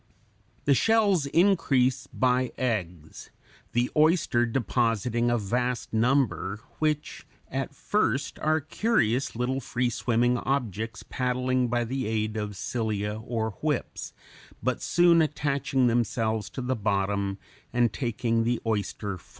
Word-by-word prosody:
The 140 Hz, -, +5 dB
shells 200 Hz, -, +3 dB
increase 140 Hz, -7 st, +2 dB
by 125 Hz, -1 st, +1 dB
eggs, 90 Hz, -10 st, -3 dB, 0.4 s
the 120 Hz, +1 st, +1 dB
oyster 155 Hz, -6 st, +3 dB
depositing 120 Hz, 0 st, 0 dB
a 120 Hz, -, +2 dB
vast 120 Hz, +4 st, -2 dB
number, 110 Hz, -, +1 dB, 0.2 s
which 155 Hz, -1 st, -1 dB, 0.2 s
at 135 Hz, +1 st, -3 dB
first 140 Hz, -9 st, 0 dB
are 155 Hz, +1 st, +2 dB
curious 140 Hz, -, 0 dB
little 125 Hz, +3 st, -1 dB
free 125 Hz, -1 st, -1 dB
swimming 120 Hz, +1 st, +1 dB
objects 115 Hz, -5 st, -2 dB
(Fig. -, -, -30 dB
84) -, -, -11 dB
paddling 125 Hz, 0 st, +1 dB
by 120 Hz, 0 st, 0 dB
the 130 Hz, +2 st, -3 dB
aid 110 Hz, 0 st, -1 dB
of 105 Hz, -1 st, -3 dB
cilia 105 Hz, -1 st, -2 dB
or 110 Hz, -1 st, -2 dB
whips, -, -, -2 dB, 0.5 s
but 130 Hz, +1 st, 0 dB
soon 175 Hz, -1 st, +4 dB
attaching 140 Hz, -3 st, 0 dB
themselves 115 Hz, -2 st, 0 dB
to 130 Hz, -, -6 dB
the 130 Hz, +1 st, 0 dB
bottom 100 Hz, -2 st, 0 dB, 0.3 s
and 120 Hz, -3 st, +2 dB
taking 115 Hz, -2 st, 0 dB
the 120 Hz, 0 st, 0 dB
oyster -, -, -1 dB
form. 110 Hz, -, +3 dB
[Illustration: 100 Hz, -1 st, -4 dB
FIG. -, -, -22 dB
120 Hz, 135 wpm, -27 LUFS, 110-135 Hz, 0.5 s, The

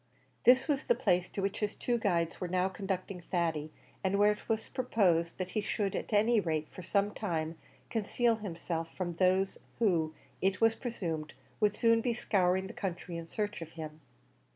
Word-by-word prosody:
This 255 Hz, +4 st, +7 dB
was 285 Hz, -3 st, 0 dB
the 240 Hz, -, +4 dB
place 180 Hz, -7 st, +2 dB
to 195 Hz, -, -3 dB
which 195 Hz, -, -1 dB
his 210 Hz, -1 st, -1 dB
two 240 Hz, -1 st, 0 dB
guides 170 Hz, -6 st, 0 dB
were 180 Hz, -, -1 dB
now 180 Hz, +1 st, +2 dB
conducting 190 Hz, -1 st, -4 dB
Thady, 165 Hz, -3 st, -1 dB, 0.3 s
and 190 Hz, +1 st, +2 dB
where 205 Hz, +1 st, +6 dB
it 210 Hz, -, -7 dB
was 220 Hz, 0 st, 0 dB
proposed 185 Hz, -10 st, +1 dB
that 185 Hz, -1 st, -3 dB
he 215 Hz, -, 0 dB
should, 205 Hz, -1 st, -1 dB
at -, -, -4 dB
any 220 Hz, +2 st, +4 dB
rate 155 Hz, -5 st, -1 dB
for -, -, -9 dB
some 200 Hz, +3 st, +1 dB
time, 165 Hz, -5 st, -2 dB, 0.4 s
conceal 230 Hz, +1 st, +1 dB
himself 170 Hz, -5 st, -4 dB
from 175 Hz, -2 st, -2 dB
those, 190 Hz, +1 st, +2 dB, 0.2 s
who, 165 Hz, -8 st, +2 dB, 0.3 s
it 190 Hz, 0 st, +2 dB
was 225 Hz, 0 st, +5 dB
presumed, 170 Hz, -11 st, -4 dB, 0.3 s
would 210 Hz, -1 st, +3 dB
soon 230 Hz, 0 st, +4 dB
be 235 Hz, 0 st, 0 dB
scouring 190 Hz, -4 st, +2 dB
the 190 Hz, -, -7 dB
country 180 Hz, -2 st, -4 dB
in 165 Hz, 0 st, -5 dB
search 205 Hz, -1 st, -3 dB
of 165 Hz, 0 st, -8 dB
him. 155 Hz, -1 st, -7 dB
190 Hz, 185 wpm, -32 LUFS, 170-215 Hz, 0.4 s, This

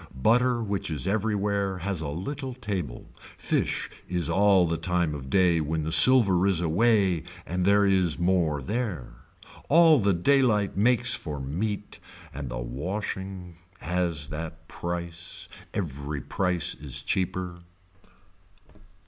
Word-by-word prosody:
Butter 120 Hz, -, +2 dB
which 100 Hz, -4 st, -3 dB
is 80 Hz, +3 st, -1 dB
every 105 Hz, +2 st, 0 dB
where 100 Hz, -1 st, -1 dB
has 90 Hz, -1 st, -3 dB
a 80 Hz, -, -4 dB
little 130 Hz, -, -5 dB
table, 95 Hz, -, -5 dB
fish -, -, -3 dB, 0.2 s
is 90 Hz, -3 st, -1 dB
all 100 Hz, -2 st, +4 dB
the 85 Hz, -, -1 dB
time 90 Hz, -2 st, -1 dB
of 65 Hz, -2 st, -7 dB
day 90 Hz, -1 st, +3 dB
when 80 Hz, +1 st, -2 dB
the 80 Hz, -, -3 dB
silver 100 Hz, -4 st, +6 dB
is 95 Hz, -4 st, +2 dB
away 95 Hz, 0 st, +2 dB, 0.2 s
and 90 Hz, +1 st, -2 dB
there 100 Hz, +1 st, +4 dB
is 95 Hz, -5 st, +2 dB
more 85 Hz, -5 st, +1 dB
there. 100 Hz, -, -4 dB, 0.6 s
All 160 Hz, -1 st, +6 dB
the 100 Hz, -3 st, +2 dB
daylight 105 Hz, -1 st, +2 dB
makes 120 Hz, +3 st, +4 dB
for 75 Hz, -8 st, -4 dB
meat 100 Hz, +10 st, -4 dB, 0.3 s
and 70 Hz, -2 st, -6 dB
the 65 Hz, -, -5 dB
washing 90 Hz, -, -5 dB, 0.2 s
has 85 Hz, -4 st, -2 dB
that 80 Hz, +1 st, -7 dB
price, 85 Hz, -1 st, -5 dB, 0.2 s
every 75 Hz, -4 st, -4 dB
price 90 Hz, +2 st, +1 dB
is 70 Hz, -3 st, -3 dB
cheaper. 90 Hz, -1 st, -2 dB
90 Hz, 130 wpm, -26 LUFS, 80-105 Hz, 0.6 s, silver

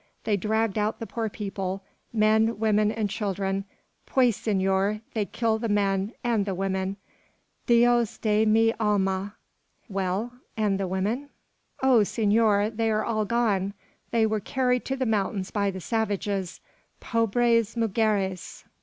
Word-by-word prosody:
they 210 Hz, -, +1 dB
dragged 220 Hz, +1 st, 0 dB
out 210 Hz, +1 st, 0 dB
the 225 Hz, -, -5 dB
poor 225 Hz, -1 st, -3 dB
people 195 Hz, -2 st, -4 dB, 0.3 s
men, 220 Hz, +1 st, +3 dB
women 215 Hz, -1 st, +2 dB
and 220 Hz, -2 st, -1 dB
children! 195 Hz, -1 st, -2 dB, 0.4 s
Pues, 250 Hz, -5 st, +3 dB
senor; 195 Hz, 0 st, 0 dB
they 215 Hz, -3 st, 0 dB
kill 225 Hz, +1 st, 0 dB
the 230 Hz, 0 st, -2 dB
men: 200 Hz, 0 st, +1 dB
and 235 Hz, -4 st, +1 dB
the 195 Hz, -, -1 dB
women: 190 Hz, +1 st, -2 dB, 0.7 s
Dios 240 Hz, -1 st, +4 dB
de 215 Hz, 0 st, +2 dB
mi 225 Hz, +1 st, +4 dB
alma!" 200 Hz, -1 st, 0 dB, 0.5 s
"Well, 195 Hz, +3 st, -2 dB, 0.2 s
and 205 Hz, -3 st, +1 dB
the 195 Hz, -, -1 dB
women?" 210 Hz, +10 st, -2 dB, 0.5 s
"Oh, 260 Hz, -4 st, +6 dB
senor! 210 Hz, 0 st, +2 dB
they 225 Hz, 0 st, 0 dB
are 215 Hz, 0 st, +1 dB
all 215 Hz, -2 st, 0 dB
gone; 200 Hz, -3 st, 0 dB, 0.3 s
they 230 Hz, -1 st, +2 dB
were 215 Hz, 0 st, 0 dB
carried 250 Hz, +3 st, 0 dB
to 270 Hz, -, -1 dB
the 260 Hz, -1 st, -1 dB
mountains 200 Hz, -3 st, -1 dB
by 200 Hz, -2 st, +1 dB
the 190 Hz, -1 st, -5 dB
savages. 200 Hz, -3 st, -2 dB, 0.4 s
Pobres 230 Hz, 0 st, +1 dB
mugeres!" 205 Hz, -4 st, -1 dB
215 Hz, 140 wpm, -26 LUFS, 195-225 Hz, 0.7 s, Oh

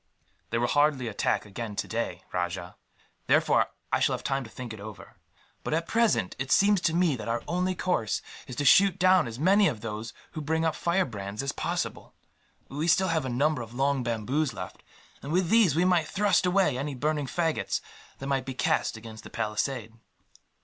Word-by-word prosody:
"They 115 Hz, -, 0 dB
will 120 Hz, -, +1 dB
hardly 145 Hz, -1 st, +2 dB
attack 105 Hz, 0 st, 0 dB
again 105 Hz, +1 st, -6 dB
today, 95 Hz, -5 st, -3 dB
Rajah; 90 Hz, 0 st, -3 dB, 0.5 s
therefore -, -, +4 dB, 0.3 s
I -, -, +4 dB
shall -, -, +2 dB
have -, -, -8 dB
time 135 Hz, 0 st, -1 dB
to 115 Hz, -, -11 dB
think 120 Hz, 0 st, -7 dB
it 110 Hz, -, -9 dB
over. 105 Hz, +1 st, -10 dB, 0.5 s
But -, -, -1 dB
at 165 Hz, +1 st, -2 dB
present, 215 Hz, -, +2 dB
it 135 Hz, +1 st, -3 dB
seems 200 Hz, -1 st, +4 dB
to 165 Hz, -, +1 dB
me 175 Hz, -5 st, +3 dB
that 110 Hz, -3 st, -7 dB
our 115 Hz, 0 st, -1 dB
only 180 Hz, +2 st, 0 dB
course 170 Hz, -, -1 dB, 0.2 s
is 125 Hz, -, -7 dB
to 145 Hz, -, -2 dB
shoot 190 Hz, +5 st, +6 dB
down 185 Hz, -5 st, +4 dB
as 115 Hz, 0 st, -7 dB
many 195 Hz, +7 st, +4 dB
of 115 Hz, -9 st, -3 dB
those 110 Hz, 0 st, -5 dB, 0.2 s
who 155 Hz, -, -5 dB
bring 160 Hz, +2 st, 0 dB
up 160 Hz, -, +2 dB
firebrands 110 Hz, -, -1 dB
as 140 Hz, -, -1 dB
possible. -, -, -4 dB, 0.5 s
We 145 Hz, +4 st, -3 dB
have 170 Hz, -, +5 dB
still 190 Hz, +1 st, +3 dB
a 160 Hz, -5 st, 0 dB
number 145 Hz, +3 st, +1 dB
of 115 Hz, +1 st, -9 dB
long 135 Hz, +1 st, +1 dB
bamboos 125 Hz, +5 st, -1 dB
left, -, -, -7 dB, 0.4 s
and 140 Hz, -, -6 dB
with 180 Hz, 0 st, +1 dB
these 220 Hz, -10 st, +5 dB
we 175 Hz, +3 st, +3 dB
might 175 Hz, -4 st, +3 dB
thrust 200 Hz, -2 st, +2 dB
away 180 Hz, -8 st, +2 dB
any 140 Hz, 0 st, -3 dB
burning 150 Hz, +1 st, -1 dB
faggots 165 Hz, +3 st, -1 dB, 0.4 s
that 135 Hz, -, -7 dB
might 135 Hz, -1 st, 0 dB
be 130 Hz, -, -4 dB
cast 115 Hz, -, 0 dB
against 110 Hz, -1 st, -10 dB
the -, -, -10 dB
palisade." 110 Hz, +1 st, -2 dB
140 Hz, 195 wpm, -28 LUFS, 115-170 Hz, 0.5 s, shoot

